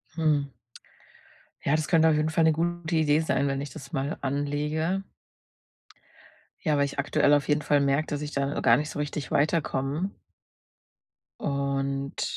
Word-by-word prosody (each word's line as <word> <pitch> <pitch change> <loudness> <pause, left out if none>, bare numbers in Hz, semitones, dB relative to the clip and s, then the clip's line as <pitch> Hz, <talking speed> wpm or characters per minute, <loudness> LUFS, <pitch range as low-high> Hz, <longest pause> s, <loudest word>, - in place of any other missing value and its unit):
Hm. 150 -4 +1 1.1
Ja, 145 - +2
das 155 0 -1
könnte 160 -2 +5
auf 155 - +3
jeden 155 +1 +1
Fall 165 +1 +2
'ne 160 - +5
gute 170 0 -2
Idee 150 -1 +3
sein, 160 -3 +1
wenn 135 0 -1
ich 145 - -5
das 135 - -11
mal 140 +3 -2
anlege. 150 +6 -1 1.6
Ja, 150 -4 +2
weil 140 - +3
ich 140 - -6
aktuell 145 +1 +3
auf 145 -1 +2
jeden 150 0 +1
Fall 145 -1 +3
merke, 140 +3 +2
dass 145 0 -3
ich 150 0 -5
da 140 0 -1
gar - - +5
nicht 150 +1 -3
so - - -6
richtig 145 -2 -4
weiterkomme. 150 +3 0 1.3
Und 140 -1 -2
145 Hz, 160 wpm, -27 LUFS, 140-155 Hz, 1.6 s, könnte